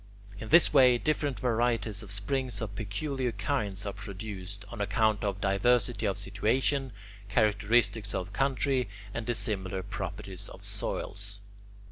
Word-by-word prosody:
In 110 - -7
this 170 -1 +6
way, 130 -3 +7
different 145 -1 0
varieties 115 -3 +1
of 105 - -10
springs 125 +6 -1
of 110 -3 -4
peculiar 125 +6 -2
kinds 105 -2 -2
are 100 - -3
produced, 100 0 -7
on 115 -2 -6
account 110 +1 +2
of 100 -2 -1
diversity 110 +2 +2
of 100 - 0
situation, 130 +7 +1 0.4
characteristics 105 0 +2
of 90 - -3
country, 135 -3 +1 0.2
and 115 -1 -4
dissimilar 100 -5 -1
properties 95 -1 -6
of - - -12
soils. 100 0 -4
105 Hz, 130 wpm, -30 LUFS, 100-125 Hz, 0.4 s, way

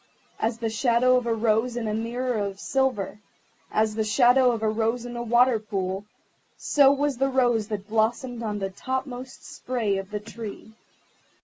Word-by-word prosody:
As 225 +1 0
the 230 -1 -2
shadow 240 +2 +3
of 250 -1 0
a 230 - +2
rose 225 +2 +1
in 230 -2 -2
a 210 - -1
mirror 240 +3 -2
of 200 -1 -3
silver, 255 -7 -1 0.5
as 215 0 +1
the 220 0 0
shadow 245 +4 +4
of 225 -2 -3
a - - +2
rose 225 +2 0
in 240 0 -7
a 240 - -3
water 240 0 +3
pool, 195 -2 -3 0.5
so 280 -2 +4
was 285 -1 0
the 270 +2 +1
rose 245 -5 +2
that 205 -2 -5
blossomed 230 +3 0
on 210 -2 -2
the 195 -1 -3
topmost 260 +4 -5
spray 225 -6 -2
of 195 0 -7
the 210 0 -3
Tree. 220 0 -9
230 Hz, 180 wpm, -25 LUFS, 215-250 Hz, 0.5 s, shadow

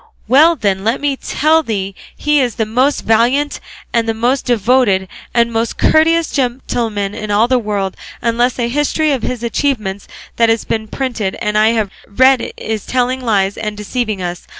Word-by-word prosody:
Well 305 +8 +5
then 200 -7 -1
let 225 +5 0
me 285 -1 0
tell 310 +4 +1
thee 200 -8 -3 0.2
he 295 0 +2
is 250 -4 0
the 220 - 0
most 255 +6 +1
valiant 245 +6 +1 0.3
and 230 -1 +1
the 225 - 0
most 245 +4 0
devoted 230 -4 +2 0.2
and 235 -1 +2
the - - -10
most 225 +1 -1
courteous 330 +1 +3
gentleman 240 -6 -2
in 215 0 -6
all 210 +3 +3
the 255 0 +2
world, 205 -4 -2 0.2
unless 240 +1 0
a 240 -2 0
history 295 +4 0
of 265 -4 0
his 250 -2 -4
achievements 220 -6 -2 0.3
that 230 -1 +4
has 225 0 +1
been 220 -1 -2
printed 230 -6 -3
and 210 0 -2
I 215 +2 +4
have 215 -4 -1 0.2
read 260 +4 +3
is 220 -2 -4
telling 255 +1 0
lies 200 -5 0
and 210 -1 -4
deceiving 210 -2 -3
us. 175 0 -5
235 Hz, 180 wpm, -16 LUFS, 210-260 Hz, 0.3 s, Well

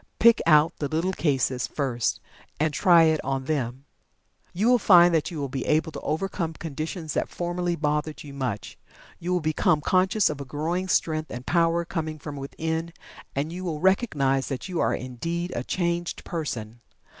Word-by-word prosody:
Pick 235 0 +6
out 155 +1 +5
the 145 - -1
little 165 +5 -1
cases 130 -6 0
first 125 -5 -1 0.4
and 155 0 +1
"try 170 0 +6
it 160 -1 +2
on 135 -1 -2
them." 130 -2 -2 0.7
You 205 +6 0
will 250 0 +5
find 175 -4 +7
that 160 -2 +1
you 170 - -7
will 140 - -2
be 130 0 -4
able 160 +1 +2
to - - -6
overcome 165 +1 -2
conditions 160 +1 -5
that - - -1
formerly 175 0 -2
bothered 150 0 -2
you 145 -2 -10
much. 125 -7 -4 0.4
You 175 +2 -3
will 180 -1 +1
become 155 0 +2
conscious 185 +6 +2
of 145 -2 -3
a - - -3
growing 160 +7 -2
strength 155 -1 0
and 125 +1 -7
power 170 0 +2
coming 155 -2 -3
from 145 -1 -7
within, 160 +4 -3 0.4
and 150 +4 -2
you 185 +1 -6
will 165 -4 -3
recognize 150 - +2
that 135 +3 -4
you 180 -3 -3
are - - +2
indeed 165 +8 -4
a 120 - -2
changed 170 +2 -2
person. 120 -9 -5
155 Hz, 180 wpm, -26 LUFS, 140-175 Hz, 0.7 s, find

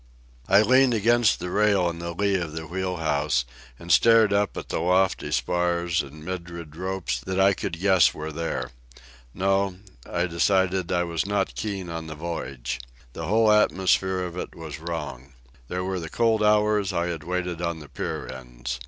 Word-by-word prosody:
I 100 +2 +6
leaned 130 +2 +4
against 115 +1 +3
the 90 +1 -4
rail 100 -3 +3
in 85 -1 -4
the 85 0 -5
lee 100 +1 +1
of 85 -5 -1
the 80 0 -5
wheel 90 +2 -3
house, 75 -5 0 0.3
and - - -6
stared 115 -3 +6
up 100 0 +1
at - - -6
the - - -1
lofty 95 +1 +1
spars 85 -1 +1
and 75 +2 -11
myriad 85 -4 -6
ropes 95 -7 -2
that 95 +9 -3
I 95 +1 +5
could 85 -2 -4
guess 95 -2 +5
were 80 +1 -6
there. 75 -6 -3 0.6
No, 95 0 +1 0.3
I 85 - 0
decided 95 +1 +1
I 90 -1 +2
was 85 +1 -2
not 100 -1 0
keen 100 -4 -4
on 80 -1 -5
the 80 - -7
voyage. 70 -7 -4 0.3
The 80 - -5
whole 110 +2 +4
atmosphere 95 -2 +2
of 90 -1 -6
it - - -6
was 80 -3 -8
wrong. 75 -5 -6 0.3
There 90 +5 -3
were 95 0 -2
the 80 -1 -6
cold 115 +1 +2
hours 105 -1 +3
I 85 -1 0
had 85 -3 -4
waited 90 0 -3
on 85 -1 -2
the 75 - -11
pier - - -5
ends. 60 -1 -6
90 Hz, 180 wpm, -25 LUFS, 80-95 Hz, 0.6 s, I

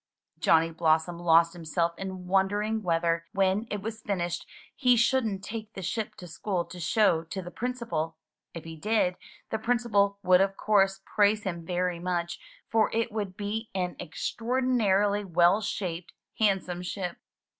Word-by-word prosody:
Johnny 165 0 +4
Blossom 160 +1 +1
lost 170 -1 +4
himself 170 0 -1
in 185 0 -6
wondering 205 +4 +1
whether, 170 -2 0
when 195 +3 +1
it 205 -2 -4
was 225 +1 -5
finished, 175 -5 -2 0.3
he 250 -2 +4
shouldn't 230 -5 +1
take 220 0 -6
the 190 - -7
ship 215 +3 -3
to 180 - -10
school 175 +1 -2
to 180 - -10
show 175 -1 +3
to 165 +4 -5
the 175 -1 -7
Principal! 230 -11 -3 0.3
If 165 - -8
he 165 0 -8
did, 195 +1 +1 0.4
the 220 - -1
Principal 220 -4 +2
would 185 0 +6
of 195 0 +1
course 195 -2 +2
praise 210 0 +2
him 170 -4 -4
very 180 -1 -1
much, 175 -1 -2 0.3
for 220 -2 +3
it 230 0 0
would 205 -4 -4
be 215 +2 -3
an 180 -2 -1
extraordinarily 210 +1 +1
well 180 +2 +4
shaped, 180 -4 -4 0.3
handsome 190 -4 +1
ship. 180 0 -4
195 Hz, 155 wpm, -28 LUFS, 175-215 Hz, 0.4 s, would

